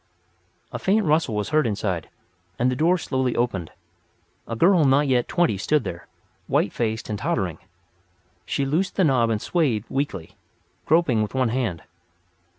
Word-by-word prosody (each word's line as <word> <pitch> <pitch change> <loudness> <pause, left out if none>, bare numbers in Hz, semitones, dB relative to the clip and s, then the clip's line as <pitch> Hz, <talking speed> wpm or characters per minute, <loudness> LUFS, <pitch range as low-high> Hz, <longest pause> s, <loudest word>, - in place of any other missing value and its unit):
A - - -5
faint 205 +2 +2
rustle 155 -7 +1
was 105 -1 -2
heard 155 -4 +2
inside, 95 -6 -2 0.5
and 125 +2 +2
the - - -1
door 170 +7 +3
slowly 130 -6 -1
opened. 100 -9 -1 0.8
A 115 - -4
girl 175 - +4
not 140 +1 +3
yet 125 -2 +2
twenty 170 - +1
stood 150 +6 +1
there, 85 - -7 0.4
white - - +1
faced 110 -2 -2
and 105 -2 -4
tottering. 90 -5 -2 0.8
She 140 +10 -1
loosed 165 +8 -1
the 190 - +2
knob 130 -7 +3
and 110 -2 0
swayed 130 - 0
weakly, 135 - -3 0.5
groping 155 -8 +3
with 105 +4 -3
one 130 -3 +2
hand. 115 -9 -2
125 Hz, 155 wpm, -23 LUFS, 110-155 Hz, 0.8 s, girl